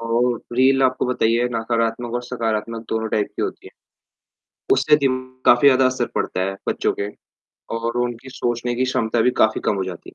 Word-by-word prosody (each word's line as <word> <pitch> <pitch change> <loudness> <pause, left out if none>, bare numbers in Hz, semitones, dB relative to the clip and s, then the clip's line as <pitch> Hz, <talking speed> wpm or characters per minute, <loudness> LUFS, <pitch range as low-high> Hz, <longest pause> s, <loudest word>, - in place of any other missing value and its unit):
और 120 +1 +1 0.2
रील 135 +1 +4
आपको 130 -1 +1
पता - - -2
ही 115 +1 +4
है 120 +1 +2
नकारात्मक 115 +1 -1
और 120 - -1
सकारात्मक 115 -2 -3
दोनों 110 0 -1
टाइप 105 -1 0
की - - -1
होती - - -5
है, - - -11 1.0
उससे 135 +3 +4
दिम 130 -1 +1 0.2
काफ़ी 120 +4 +6
ज़्यादा 130 -1 +5
असर 130 0 +1
पड़ता 95 - -1
है 95 +1 -2
बच्चों - - 0
के 100 0 -2 0.7
और 115 +1 -3
उनकी 120 +2 -5
सोचने 120 0 -1
की 125 - 0
क्षमता 115 -2 0
भी 125 - +3
काफ़ी 110 0 +1
कम - - +2
हो 95 - -1
जाती 90 -2 -5
है। - - -38
120 Hz, 200 wpm, -21 LUFS, 110-125 Hz, 1.0 s, काफ़ी